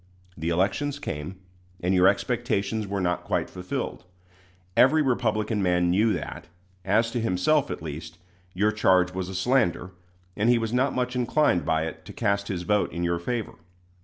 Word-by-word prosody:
The 80 +1 -3
elections 105 +12 0
came, 75 - -5 0.4
and 90 +2 0
your 90 0 +5
expectations 110 -1 0
were 100 0 -2
not 90 -1 -1
quite - - -1
fulfilled. 90 0 -4 0.7
Every 155 +4 +5
Republican 110 -4 0
man 90 -1 +2
knew 105 +5 +3
that, - - -6 0.4
as 115 +4 +2
to 120 - -1
himself 115 +8 +1
at - - -5
least, 80 +2 -7 0.4
your 105 +3 +2
charge 95 -4 +3
was 95 0 -4
a 95 - -6
slander, 95 -4 +1 0.4
and 105 +3 +1
he 120 - +5
was 115 0 -2
not 130 +3 +1
much 125 0 -1
inclined 125 - +2
by 80 0 +1
it 80 0 -7
to - - -10
cast 100 -3 0
his 90 -3 -3
vote 105 +2 +1
in 85 +2 -3
your 85 0 0
favor. 115 +5 -3
100 Hz, 170 wpm, -26 LUFS, 90-120 Hz, 0.7 s, your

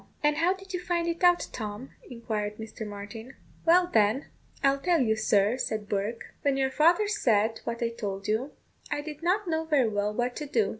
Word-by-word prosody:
"And 295 0 +3
how 355 +3 +3
did 385 0 -12
you 360 - -1
find 345 -1 -1
it 335 +1 -3
out, 355 0 +5
Tom?" 215 +3 -6 0.2
inquired 215 -4 -3
Mr. 220 0 -7
Martin. 205 +5 -8 0.3
"Why, 350 +2 +5
then, 220 +6 +3 0.4
I'll 275 0 +3
tell 345 +2 +2
you, 220 -4 +2
sir," 215 +1 +2
said 215 -3 -2
Bourke. 210 +3 -3
"When 280 -1 +1
your 265 -1 +1
father 340 +9 +4
said 225 - +1
what 235 0 -3
I 230 - +1
told 205 -4 -5
you, 225 +7 0 0.4
I 290 - -1
did 300 0 -8
not 370 +4 +1
know 320 -1 0
very 285 -7 +3
well 205 0 0
what 245 +3 -1
to 300 - -4
do. 225 -8 +1
245 Hz, 200 wpm, -28 LUFS, 215-320 Hz, 0.4 s, out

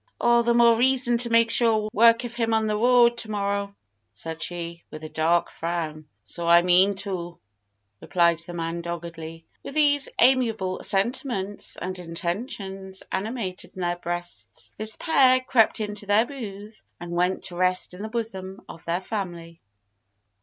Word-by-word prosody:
"All 240 0 +4
the 235 0 +1
more 235 -1 +6
reason 245 0 +3
to 240 0 +2
make 230 0 +4
sure 225 -3 +3
work 230 +2 +5
of 240 -1 -6
him 230 -1 0
on 220 0 +1
the 215 -1 0
road 240 +1 +4
to 225 - -1
morrow!" 200 -1 -2 0.4
said 160 +11 -7
she, 170 0 -4
with 155 0 -10
a 155 - -6
dark 165 +3 +1
frown. 160 -2 -4 0.2
"So 170 +10 -4
I 170 0 +6
mean 185 +3 +4
to!" 175 -3 -5 0.6
replied 170 -2 +2
the 170 +1 -8
man 165 0 -3
doggedly. 165 -1 -7 0.2
With 275 - -9
these 290 -2 +3
amiable 225 -7 +2
sentiments 205 -1 -1
and 185 0 -5
intentions 190 +2 -4
animating 190 -3 -4
their 175 -1 -2
breasts, 175 0 -5
this 215 +1 0
pair 260 -5 +4
crept 250 -4 +2
into 210 -1 -3
their 205 +3 +4
booth 215 -5 -9 0.2
and 175 0 -8
went 180 +2 0
to 175 - -4
rest 185 0 +1
in 180 - -9
the 215 - -5
bosom 195 -5 -5
of 165 - -11
their 170 +2 -1
family. 175 -5 -6
195 Hz, 160 wpm, -24 LUFS, 175-230 Hz, 0.6 s, more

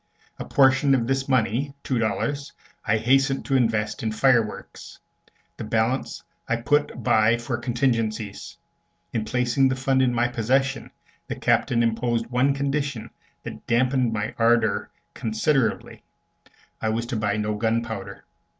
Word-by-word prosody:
A - - -5
portion 135 0 +4
of 120 -3 0
this 135 +2 -1
money, 130 +3 0
two 130 -3 -1
dollars, 140 +6 -2 0.3
I 110 0 +1
hastened 135 +4 +2
to 135 - 0
invest 115 -4 0
in 110 - -1
fireworks; 115 -1 0 0.6
the - - -6
balance 115 +4 -1 0.3
I 115 - +2
put 125 +1 0
by 110 +3 +3
for 120 +1 -3
contingencies. 115 -4 -2 0.6
In 110 -2 -1
placing 125 +3 +1
the 130 - 0
fund 130 0 +1
in 130 -1 +3
my 120 0 +1
possession, 130 +3 0 0.4
the - - -4
Captain 120 -1 +1
imposed 115 0 0
one 130 +3 +2
condition 140 -3 -2 0.3
that - - -9
dampened 125 0 +2
my 105 -1 -3
ardor 115 0 +2 0.2
considerably 115 +2 -1 0.8
I 110 - 0
was 115 +2 -1
to 120 +1 -4
buy 105 -1 0
no 105 0 -1
gunpowder. 110 -1 -3
120 Hz, 140 wpm, -24 LUFS, 110-135 Hz, 0.8 s, portion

